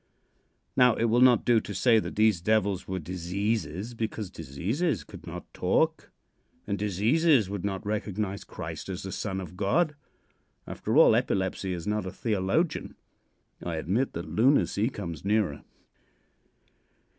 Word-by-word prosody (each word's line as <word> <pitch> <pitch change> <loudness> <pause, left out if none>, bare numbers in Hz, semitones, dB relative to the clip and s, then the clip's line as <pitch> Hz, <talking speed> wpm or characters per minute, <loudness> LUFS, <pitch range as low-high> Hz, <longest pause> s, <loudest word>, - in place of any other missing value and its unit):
Now, 125 -2 +5
it - - -1
will 115 +1 +3
not 125 -3 +6
do 120 -2 +5
to 105 - -7
say 115 +3 +4
that - - -5
these 105 -4 +3
devils 100 -2 +1
were 95 - -2
diseases, 95 +4 -3
because 110 -3 -4
diseases 95 - -2
could - - -13
not - - -8
talk, - - +1 0.6
and 100 - -1
diseases 105 - +2
would 100 -3 -4
not 100 -1 -3
recognize 105 -1 -2
Christ 80 +1 -7
as 95 -1 -4
the 95 - -5
Son 95 -1 -3
of 90 -2 -8
God. 150 - +1 0.7
After - - -2
all, - - +7
epilepsy 95 0 0
is 85 -2 -4
not 105 -2 -1
a - - -4
theologian. 110 - -1 0.7
I 85 -1 -3
admit 100 +12 0
that 85 +1 -5
lunacy 115 -2 +2
comes 85 - -6
nearer. 100 -7 0
100 Hz, 145 wpm, -28 LUFS, 95-115 Hz, 0.7 s, all